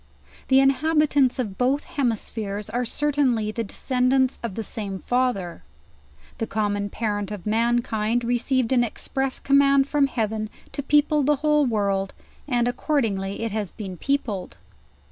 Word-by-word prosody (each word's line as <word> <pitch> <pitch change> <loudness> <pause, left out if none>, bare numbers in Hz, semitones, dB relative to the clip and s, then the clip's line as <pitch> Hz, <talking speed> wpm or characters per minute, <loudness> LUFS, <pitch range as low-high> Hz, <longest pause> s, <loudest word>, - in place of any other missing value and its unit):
The 265 0 +5
inhabitants 280 -1 +3
of 215 -7 -4
both 265 +3 +2
hemispheres 215 -5 -3
are 245 +1 -1
certainly 260 -5 +1
the 230 +1 -3
descendants 255 +4 +1
of 230 -5 -4
the 225 - -3
same 200 -3 -5
father; 245 -9 0 0.8
the 225 - -1
common 205 -1 -1
parent 205 -2 -2
of 205 -4 -7
man 235 +2 +2
kind 220 +2 -1
received 245 +1 0
an 250 -2 +4
express 265 +3 -3
command 275 0 +4
from 285 -1 +2
Heaven 220 -4 -2 0.2
to - - -4
people 295 +1 +3
the 295 +2 +3
whole 300 -2 +4
world, 200 -4 0 0.3
and 240 -3 +1
accordingly 225 -8 -1
it 230 - -2
has 210 -3 -3
been 195 -4 -7
peopled. 220 - -2
240 Hz, 145 wpm, -24 LUFS, 210-270 Hz, 0.8 s, The